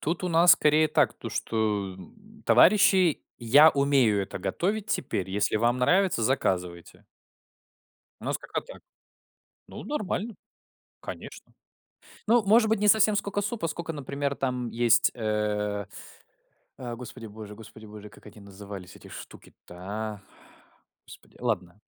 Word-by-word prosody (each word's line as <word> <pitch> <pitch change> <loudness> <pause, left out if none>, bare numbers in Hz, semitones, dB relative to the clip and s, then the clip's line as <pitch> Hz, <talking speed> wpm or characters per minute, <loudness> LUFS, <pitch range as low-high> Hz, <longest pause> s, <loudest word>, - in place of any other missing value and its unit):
Тут 165 +4 -3
у 180 - -1
нас 170 +1 +6
скорее 155 +1 +3
так, - - +2
то - - -8
что, 105 -4 -2
м, 210 - -16
товарищи: 190 -5 +5 0.2
"Я 140 +7 +6
умею 135 -8 +2
это 95 - -7
готовить 195 - -2
теперь. 100 - -3
Если 105 +2 0
вам 120 +3 +1
нравится, 180 +1 +2
заказывайте". 90 - -2 1.2
У - - -9
нас - - -1
как-то - - -5
так. - - -13 0.9
Ну, - - -9
нормально. 220 -5 -3 0.7
Конечно. - - -10 0.7
Ну, 230 0 +4
может 220 +2 +4
быть, 220 -1 +1
не 210 - +1
совсем 215 0 +5
сколько 205 0 -2
супа, 205 -3 -3
сколько, 165 +1 -5
например, 140 -1 -4
там 125 -3 -3
есть, 120 0 +3
э, 105 -2 -2 0.9
э, 120 -2 -6
господи 120 -1 -10
боже, 105 0 -10
господи 110 0 -13
боже, 105 0 -11
как - - -19
они 105 0 -13
назывались 100 -2 -10
эти - - -15
штуки-то, 90 - -13
а? 105 +2 -6 0.9
Господи. - - -16
Ладно. 100 -6 -3
120 Hz, 135 wpm, -26 LUFS, -, 1.2 s, нас